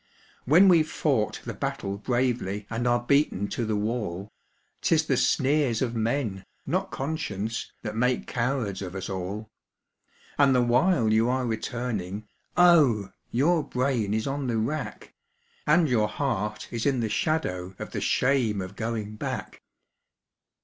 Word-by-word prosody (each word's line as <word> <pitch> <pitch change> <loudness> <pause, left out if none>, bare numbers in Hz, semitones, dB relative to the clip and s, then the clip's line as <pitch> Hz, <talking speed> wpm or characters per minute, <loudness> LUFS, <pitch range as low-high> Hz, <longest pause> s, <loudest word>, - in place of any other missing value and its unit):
When 170 +9 +6
we've 165 -4 +5
fought 130 -10 0
the - - -4
battle 100 0 -3
bravely 120 -4 -1
and 120 +2 -1
are 120 0 +2
beaten 130 -7 +2
to 120 - -2
the 110 - 0
wall, 105 -3 -3 0.5
'Tis - - +3
the - - +2
sneers 135 -4 +2
of 120 -2 -2
men, 115 -4 -1 0.2
not - - -1
conscience, 130 - -3
that 105 -1 -4
make 125 +2 +1
cowards 115 -6 -1
of 95 -1 -6
us 95 0 -4
all; 100 +4 -5 0.9
And 140 -2 +5
the 125 - +4
while 120 -2 +3
you 110 +2 +3
are 130 0 0
returning, 110 -4 -3 0.3
oh! 145 - +5 0.2
your 155 +6 +2
brain 125 -6 0
is 110 - -1
on 140 -1 -2
the 115 -2 0
rack, 145 +8 -3 0.5
And 160 +2 +5
your 115 -5 +2
heart 105 -4 -2
is 115 +2 -1
in 135 -3 +1
the 115 - 0
shadow 95 - -1
of - - -7
the - - -3
shame 125 -6 +2
of 95 +1 -6
going 110 -1 -4
back. - - -5
115 Hz, 150 wpm, -26 LUFS, 105-135 Hz, 0.9 s, When